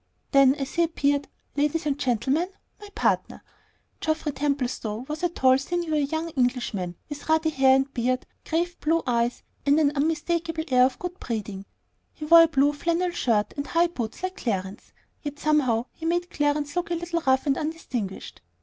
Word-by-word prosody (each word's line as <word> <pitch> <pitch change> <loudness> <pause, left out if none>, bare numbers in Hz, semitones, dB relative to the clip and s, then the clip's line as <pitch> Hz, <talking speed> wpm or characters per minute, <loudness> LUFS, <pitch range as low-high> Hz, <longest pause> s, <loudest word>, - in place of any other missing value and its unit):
Then, 275 -1 +6
as 275 -2 -5
he 340 - +1
appeared, 285 -3 0 0.3
"Ladies 300 +2 0
and 290 -2 +1
gentleman, 275 - 0 0.3
my 415 -1 -11
partner!" 460 - 0 0.6
Geoffrey 315 -1 -1
Templestowe 260 -5 -2
was 305 +2 -5
a 350 - +1
tall, 260 -5 +3
sinewy 315 -1 -1
young 320 +3 -3
Englishman, 245 - -1
with 295 +1 -8
ruddy 320 0 +3
hair 265 -2 +5
and 270 +1 0
beard, 255 +1 0 0.2
grave 345 +2 -1
blue 330 +2 +1
eyes, 235 -1 0 0.2
and 285 +2 +4
an 290 -2 +3
unmistakable 325 +2 -1
air 250 -1 +6
of 260 - -1
good 360 +1 -6
breeding. 205 -4 -5 0.5
He 305 - -7
wore 335 +2 +9
a 330 - +6
blue 285 -2 +2
flannel 340 +4 0
shirt 220 - 0
and 285 0 -4
high 340 +1 +2
boots 240 -1 -5
like 370 0 -3
Clarence's, 195 -3 -4 0.3
yet 290 -1 -5
somehow 280 -7 +2
he 325 - -6
made 350 +1 0
Clarence 290 0 0
look 355 -1 -1
a 345 - 0
little 340 0 -2
rough 265 +2 +3
and 275 -2 +2
undistinguished. 260 - -5
290 Hz, 175 wpm, -25 LUFS, 255-330 Hz, 0.6 s, wore